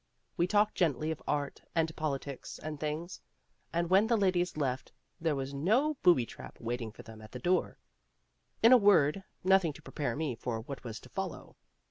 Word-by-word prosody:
We 175 -2 +2
talked 210 +2 +3
gently 155 -2 +1
of 160 - -5
art 145 -1 -1
and 165 -1 +1
politics 140 -3 -4
and 155 -2 -6
things; 155 +4 -4 0.5
and 170 0 0
when 195 +5 +5
the 230 0 +3
ladies 180 -4 +1
left 130 -3 -2 0.3
there 160 -3 +1
was 135 0 -4
no 220 - +2
booby 170 -10 +5
trap - - -11
waiting 120 -1 -3
for - - -12
them 110 -1 -12
at 110 - -13
the - - -4
door. 180 +8 0 0.9
In 230 - +8
a 255 - +10
word, 195 -5 +4 0.2
nothing 185 -4 +4
to - - -13
prepare 145 - -3
me 150 -3 -1
for 115 -1 -4
what 135 +4 -8
was 115 -3 -6
to - - -14
follow. - - -5
155 Hz, 185 wpm, -31 LUFS, 135-185 Hz, 0.9 s, a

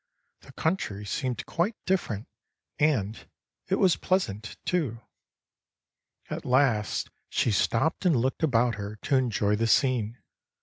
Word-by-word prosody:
The - - -15
country 105 - -1
seemed 125 +4 -2
quite 180 +7 0
different, 120 - -1 0.5
and 115 -9 0 0.4
it - - +2
was 185 -3 +3
pleasant, 110 - -1
too. 145 -11 0 1.3
At - - -4
last 125 -5 +2 0.2
she 120 - +1
stopped 115 - +1
and 175 -5 +4
looked 130 +5 0
about 125 -6 +3
her 100 +1 -5
to 135 +6 -1
enjoy 105 -5 +1
the 115 +1 +1
scene. 125 -3 +2
125 Hz, 125 wpm, -27 LUFS, 105-155 Hz, 1.3 s, and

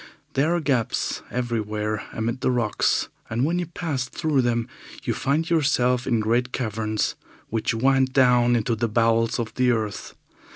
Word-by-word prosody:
There 155 +6 +2
are - - +1
gaps 130 -8 0
everywhere 110 -3 -2
amid 115 +3 -3
the - - +2
rocks, 120 -4 +1 0.2
and 120 +4 0
when 170 +3 0
you 175 - -3
pass 155 -6 -3
through 150 -4 +1
them 120 -1 0 0.4
you - - -1
find 155 +4 0
yourself 130 -7 +2
in 120 -3 +2
great 120 +3 +1
caverns, 110 -3 -1 0.4
which 115 0 -1
wind 135 +2 +3
down 125 -2 +4
into 115 0 0
the 115 +1 -1
bowels 115 +1 +2
of 115 -2 -3
the 125 -1 +2
earth. 110 -3 -2
120 Hz, 160 wpm, -24 LUFS, 115-135 Hz, 0.4 s, down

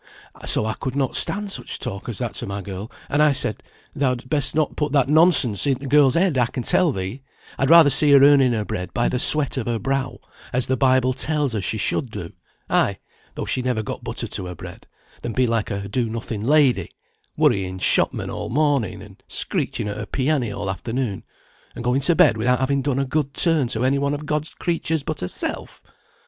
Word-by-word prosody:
So - - 0
I 110 - -1
could 130 +2 -5
not 135 -2 -1
stand 205 0 0
such - - -5
talk 110 -3 -5
as 115 - -4
that 120 -4 -3
to - - -4
my 100 0 -5
girl, 100 +3 -7 0.2
and 145 - +1
I 150 -1 +4
said, 130 -5 0 0.3
'Thou'd 125 -3 -2
best 145 -2 0
not 155 -2 0
put 150 -1 -2
that 135 -2 +2
nonsense 150 - +5
i' 135 - +2
the 135 - -10
girl's 140 -1 +4
head 170 -6 +2
I 120 - +3
can 125 0 -5
tell 175 +5 +3
thee; 95 +5 -5 0.4
I'd 135 - +1
rather 165 -3 +7
see 150 +2 +4
her 140 -1 +7
earning 140 -3 +5
her 110 -2 -2
bread 90 -2 -5
by 120 - +1
the 125 - -2
sweat 145 0 +3
of 120 - -3
her 120 -1 0
brow, 135 +1 -2 0.3
as 125 0 0
the 130 - 0
Bible 130 0 +2
tells 145 -1 0
her 110 - -2
she 105 +4 -1
should 120 +5 -1
do, 85 -7 -8 0.3
ay, - - +1 0.4
though - - -4
she 130 - -1
never 125 -3 -1
got - - -6
butter - - -4
to 90 - -5
her 90 - -7
bread, - - -11 0.3
than 120 - -4
be 130 +2 +2
like 115 -2 -1
a 100 -1 -4
do 115 +3 -1
nothing 110 -2 -5
lady, 140 0 +3 0.5
worrying 95 -1 +1
shopmen - - +1
all - - -5
morning, 140 -5 0
and - - -16
screeching - - -3
at 100 - -4
her 105 0 -6
pianny 135 -3 -1
all 100 0 -5
afternoon, 115 +2 -3 0.5
and - - -7
going 125 +3 +1
to 170 +5 +4
bed 155 -9 +4
without 125 +3 +2
having 135 +1 0
done 135 -1 -1
a 135 - 0
good 140 0 -2
turn 160 -6 +3
to 120 +1 -1
any 140 +2 +2
one 140 +1 0
of 150 +1 -7
God's 150 +1 -2
creatures 160 -3 -2
but 155 +1 -4
herself.'" 90 - -4
130 Hz, 215 wpm, -22 LUFS, 115-145 Hz, 0.5 s, rather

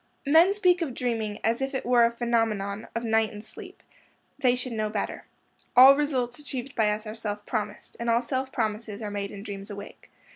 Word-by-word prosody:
Men 330 +7 +5
speak 365 -3 +3
of 275 -7 -2
dreaming 225 -4 -2
as 230 +3 +1
if 270 0 -2
it - - -3
were 240 -1 +5
a - - +3
phenomenon 225 -4 -1
of 230 - -2
night 225 -1 +2
and 210 0 -9
sleep. - - -12 0.6
They 250 -3 +3
should 250 -1 -4
know 215 -1 -1
better. 210 -1 -4 0.5
All 265 +2 +10
results 260 -4 -1
achieved 275 -2 -6
by 220 -3 +3
us 210 +1 -2
are 215 - -5
self 210 -2 -5
promised, 210 -2 -4
and 235 0 -2
all 230 +1 +3
self 260 +2 -2
promises 215 -1 -3
are 210 - -4
made 200 -1 -3
in 200 0 -9
dreams 200 0 -7
awake. 200 0 -10
230 Hz, 205 wpm, -27 LUFS, 210-255 Hz, 0.6 s, All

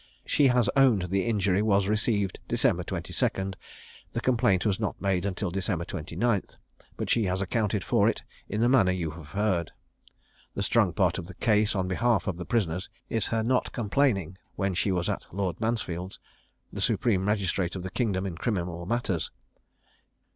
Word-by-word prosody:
She 145 - +4
has 125 -2 +3
owned 130 -9 +5
the 95 +4 0
injury 100 -3 +2
was 100 -2 +2
received 105 -2 0
December - - +2
22; 95 0 -1 0.6
the - - -1
complaint 115 -7 +2
was 100 -2 +1
not 105 -3 -2
made 95 0 0
till 100 -4 -2
December 95 -2 -1
29; 100 +6 -1 0.6
but - - -3
she 115 -3 +2
has 90 0 0
accounted 105 0 0
for - - +3
it - - -3 0.3
in 105 +2 -1
the 120 - +4
manner 120 -8 +4
you 85 -4 -2
have 80 -2 -10
heard. 95 -2 0 0.8
The - - -1
strong - - +3
part - - +1
of 85 - -7
the 95 - -10
case 105 0 +2
on 95 -2 0
behalf 115 +6 +1
of 100 - -1
the 90 - -6
prisoners 95 -6 -1 0.2
is 115 -3 0
her 115 -1 0
not 125 +2 +1
complaining 105 - 0 0.2
when 95 -1 0
she 95 +3 +1
was 90 -2 0
at - - -3
Lord 95 -1 -2
Mansfield's, 95 -5 -2 0.6
the - - -4
supreme 100 -6 +2
magistrate 95 -3 0
of 90 - -5
the 95 - -5
kingdom 100 -6 0
in 95 -3 -4
criminal 90 -6 -2
matters. 100 -8 -1
100 Hz, 175 wpm, -27 LUFS, 90-110 Hz, 0.8 s, owned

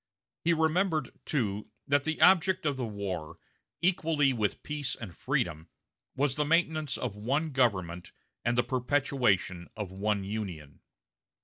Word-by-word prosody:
He 170 - +3
remembered, 160 -2 +2
too, 105 -8 -1 0.2
that 140 0 +3
the 160 0 -1
object 190 -1 +5
of 145 -2 +1
the 125 -3 -3
war, 95 -7 -4 0.5
equally 160 -6 +3
with 110 -4 -1
peace 145 -3 -3
and 95 -8 -8
freedom, 80 +2 -1 0.5
was 140 -1 +1
the 150 - 0
maintenance 155 -2 +1
of 120 -5 -3
one 140 +9 -1
government 95 -9 0 0.3
and 120 0 +1
the 120 - +4
perpetuation 125 -8 +1
of 105 -4 -4
one 100 +1 0
Union. 95 -8 -5
125 Hz, 135 wpm, -30 LUFS, 100-150 Hz, 0.5 s, object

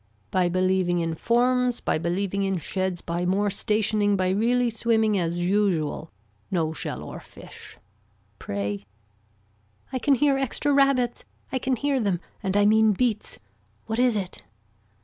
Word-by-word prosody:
By 180 -1 +2
believing 185 0 +1
in 165 -1 -1
forms 245 +6 +1
by - - -1
believing 185 +4 -1
in 195 -1 0
sheds 185 +2 -2
by 170 +1 -3
more 195 +3 +1
stationing 210 0 +1
by 185 -1 +1
really 235 +5 +2
swimming 220 -1 +1
as 175 0 -1
usual, 180 -6 0 0.4
no 160 -4 0
shell - - -5
or - - -8
fish. - - -13 0.6
Pray. 100 0 -3 1.1
I 260 - -1
can 280 +2 +3
hear 275 +1 +2
extra 275 +2 0
rabbits, 275 -3 +2 0.3
I 260 - -1
can 260 0 0
hear 280 +2 0
them 200 -6 0 0.2
and 190 +1 0
I 205 - +4
mean 220 0 +5
beats. 220 0 -1 0.5
What 225 +1 -3
is 250 -2 +3
it. 190 -3 -4
205 Hz, 150 wpm, -25 LUFS, 180-240 Hz, 1.1 s, mean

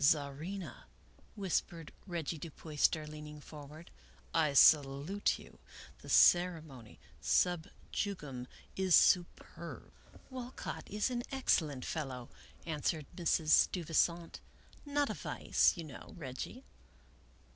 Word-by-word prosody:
Czarina," 155 +5 0 0.5
whispered 175 -5 -2 0.2
Reggie 165 -3 -3
Du 165 - -6
Puyster, 155 0 0
leaning 150 0 -9
for 145 -1 -11
ward, 155 +4 -13 0.3
" - - -28
I 145 - -2
salute 145 +7 +4
you. - - -15 0.4
The - - -12
ceremony 160 -10 +3 0.2
stib 175 -2 +2 0.2
jugum 145 -11 -3 0.3
is 190 -2 +4
superb." 175 -2 +1 0.2
" - - -20
Walcott 255 0 -6
is 210 +5 0
an 240 -1 -1
excellent 155 - +1
fellow," 130 -6 -4 0.4
answered 155 -1 -1
Mrs. 165 -3 +1
Steuvi 165 +1 +3
sant; 170 +1 +1 0.3
" - - -24
not 290 -1 +2
a - - -2
vice, - - +1
you 170 - -5
know, 145 -5 -11
Reggie." 155 - -6
160 Hz, 120 wpm, -34 LUFS, 145-180 Hz, 0.5 s, salute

